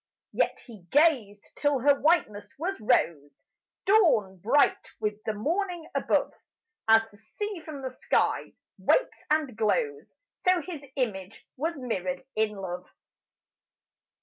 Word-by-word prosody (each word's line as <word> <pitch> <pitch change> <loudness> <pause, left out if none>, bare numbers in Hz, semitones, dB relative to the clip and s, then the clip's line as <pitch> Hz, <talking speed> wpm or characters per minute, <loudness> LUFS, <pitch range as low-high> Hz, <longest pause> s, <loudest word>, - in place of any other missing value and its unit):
Yet - - +1
he 210 -8 -13
gazed 260 -10 +2
till 290 -1 +2
her 285 +2 +6
whiteness 215 -11 +1
was 355 +3 -3
rose, 145 -9 0 0.4
Dawn 315 - +4
bright 245 +11 +2
with 210 -1 -3
the 220 - 0
morning 340 - -2
above - - +1 0.5
As 225 0 +6
the 205 - -18
sea 395 - -5
from 310 -4 -8
the 260 - -2
sky 255 - 0 0.3
wakes - - +1
and 300 -6 +1
glows, 430 - -1 0.2
So 365 -1 +3
his 325 -3 -7
image 210 -6 -3
was 325 +5 -2
mirrored 185 -8 -3
in 215 -1 +1
love. 185 -2 -6
250 Hz, 125 wpm, -28 LUFS, 205-320 Hz, 0.5 s, her